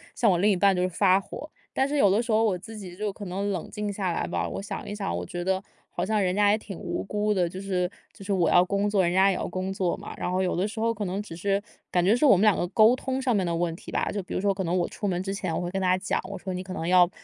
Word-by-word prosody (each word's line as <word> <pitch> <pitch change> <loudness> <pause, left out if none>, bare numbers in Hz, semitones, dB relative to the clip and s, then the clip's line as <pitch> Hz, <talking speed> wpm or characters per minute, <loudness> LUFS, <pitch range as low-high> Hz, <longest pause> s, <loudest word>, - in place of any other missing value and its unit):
向 225 - +3
我 175 - +2
另 205 +4 +3
一 - - +3
半 195 +2 +4
就 180 - 0
是 185 - +2
发 185 +1 +4
火。 295 +10 -8 0.2
但 270 - +2
是 295 +1 -1
有 205 -8 +5
的 215 +4 +3
时 235 -1 -3
候 220 +1 +4
我 195 -5 +2
自 220 +4 -10
己 180 -3 -8
就 210 -1 -2
可 205 - -8
能 195 +3 -2
冷 180 -4 -4
静 210 -1 -3
下 190 -3 -2
来 - - -1
吧， - - -1
我 - - -5
想 200 0 -6
一 - - -4
想， 145 - -2
我 90 - -4
觉 175 - -5
得 190 +1 0 0.3
好 175 - -3
像 215 0 +1
人 185 0 +1
家 205 0 +4
也 215 - +3
挺 200 -4 -9
无 - - -3
辜 210 +1 0
的。 180 -3 +1
就 185 +3 -7
是 180 -2 -1 0.2
就 195 - -12
是 200 - 0
我 180 -3 +2
要 175 - +6
工 200 +2 0
作， 200 -2 +3
人 175 +1 +1
家 190 +1 +5
也 190 - +1
要 - - -3
工 185 +1 -3
作 185 -2 0
嘛， - - -9
然 - - -2
后 185 +1 +1
有 180 - 0
的 185 +4 0
时 220 +1 -5
候 230 0 +2
可 205 -2 -4
能 195 +3 -3
只 165 - -10
是 195 +4 -1 0.3
感 175 -1 +2
觉 200 +4 +4
是 245 +5 +3
我 230 - +7
们 185 - +1
两 215 -2 +5
个 175 - -1
沟 220 +5 +5
通 260 +1 -2
上 255 -2 +1
面 190 -3 +1
的 170 -1 -1
问 170 -1 0
题 - - -12
吧。 - - -1
就 205 - -2
比 180 - -8
如 - - -1
说 200 -1 +2
可 190 -2 -3
能 175 +2 0
我 175 - +1
出 205 - -4
门 180 0 -1
之 195 0 -3
前 185 -5 -3
我 - - -1
会 175 0 -3
跟 195 0 -2
他 185 0 +3
讲， 190 - -1
我 200 - -5
说： 190 - -6
“你 180 - -3
可 185 0 -7
能 165 - -4
要， 180 0 +5
195 Hz, 360 characters per minute, -26 LUFS, 180-210 Hz, 0.3 s, 我